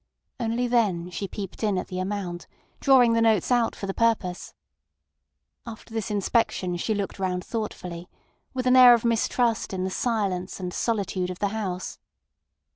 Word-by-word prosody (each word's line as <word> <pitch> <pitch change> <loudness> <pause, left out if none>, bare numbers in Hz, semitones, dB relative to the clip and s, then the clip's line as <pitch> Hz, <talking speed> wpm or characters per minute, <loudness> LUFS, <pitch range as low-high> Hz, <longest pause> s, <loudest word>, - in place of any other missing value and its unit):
Only 235 +1 0
then 195 -8 +1
she 195 +3 -4
peeped 195 -1 -7
in 210 -4 +1
at 180 - -4
the 185 - -4
amount, 185 -2 -4 0.3
drawing 255 -4 +5
the 230 - +2
notes 220 -2 +2
out 240 -2 +2
for - - -6
the 195 - -3
purpose. 215 -6 0 1.1
After 225 -1 -10
this 225 0 -3
inspection 200 -3 0
she 215 +5 -1
looked 200 -1 -4
round 180 -1 -2
thoughtfully, 180 -6 -5 0.4
with 255 -1 -3
an 255 0 +5
air 250 -1 +9
of 235 - -4
mistrust 230 -1 +1
in 185 -1 -2
the 190 - -2
silence 200 -7 -1
and 180 -1 -4
solitude 195 -5 -1
of 180 - -5
the 200 - 0
house. 195 -4 -4
205 Hz, 165 wpm, -25 LUFS, 185-230 Hz, 1.1 s, air